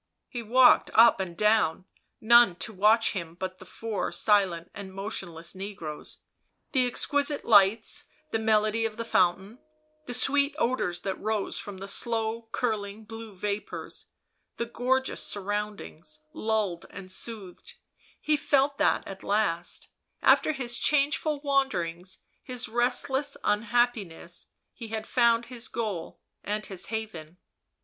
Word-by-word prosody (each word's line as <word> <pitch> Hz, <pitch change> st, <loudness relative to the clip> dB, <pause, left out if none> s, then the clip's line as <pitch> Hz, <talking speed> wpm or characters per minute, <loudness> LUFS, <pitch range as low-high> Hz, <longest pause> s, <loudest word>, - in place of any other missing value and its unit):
He 240 Hz, -, -5 dB
walked 245 Hz, +3 st, +5 dB
up 230 Hz, -1 st, +7 dB
and 175 Hz, -3 st, -4 dB
down, 210 Hz, -5 st, +2 dB, 0.3 s
none 235 Hz, -4 st, +6 dB
to 220 Hz, -, -6 dB
watch 215 Hz, +4 st, +4 dB
him 170 Hz, -4 st, -5 dB
but 185 Hz, +1 st, -5 dB
the 185 Hz, -, -13 dB
four 225 Hz, -3 st, -3 dB
silent 190 Hz, -5 st, +2 dB
and 195 Hz, -1 st, -8 dB
motionless 190 Hz, -4 st, -5 dB
negroes; 185 Hz, -6 st, -7 dB, 0.5 s
the 255 Hz, -3 st, +2 dB
exquisite 285 Hz, +3 st, 0 dB
lights, 205 Hz, 0 st, +4 dB, 0.3 s
the 225 Hz, -, 0 dB
melody 215 Hz, 0 st, +2 dB
of 225 Hz, -1 st, -2 dB
the 230 Hz, -, -4 dB
fountain, 190 Hz, +3 st, +1 dB, 0.5 s
the 245 Hz, -, -4 dB
sweet 280 Hz, +3 st, +2 dB
odours 235 Hz, -, 0 dB
that 195 Hz, -1 st, -4 dB
rose 215 Hz, -2 st, -2 dB
from 205 Hz, -2 st, -7 dB
the 195 Hz, +1 st, -7 dB
slow 225 Hz, +1 st, -2 dB
curling 215 Hz, -3 st, -2 dB
blue 225 Hz, -1 st, -9 dB
vapours, 205 Hz, +2 st, -5 dB, 0.5 s
the 235 Hz, -, -1 dB
gorgeous 255 Hz, +3 st, 0 dB
sur 205 Hz, -, -2 dB
roundings, 200 Hz, -6 st, -5 dB
lulled 215 Hz, -6 st, -1 dB
and 185 Hz, 0 st, -9 dB
soothed; 200 Hz, -2 st, -8 dB, 0.4 s
he 305 Hz, -, +2 dB
felt 280 Hz, -1 st, +1 dB
that -, -, +2 dB
at 195 Hz, -1 st, -8 dB
last, 200 Hz, -5 st, -1 dB, 0.4 s
after -, -, +5 dB
his 245 Hz, -4 st, -1 dB
changeful 295 Hz, +1 st, +1 dB
wanderings, 190 Hz, -, -1 dB, 0.2 s
his 250 Hz, -1 st, -3 dB
restless 255 Hz, +4 st, 0 dB
unhappi 230 Hz, +1 st, +2 dB
ness, 165 Hz, -, -10 dB, 0.3 s
he 230 Hz, -, -9 dB
had 220 Hz, 0 st, -4 dB
found 235 Hz, -1 st, +3 dB
his 235 Hz, -2 st, -6 dB
goal 210 Hz, -8 st, -4 dB, 0.2 s
and 210 Hz, +1 st, -3 dB
his 190 Hz, -3 st, -6 dB
haven. 180 Hz, -7 st, -6 dB
220 Hz, 135 wpm, -28 LUFS, 190-240 Hz, 0.5 s, up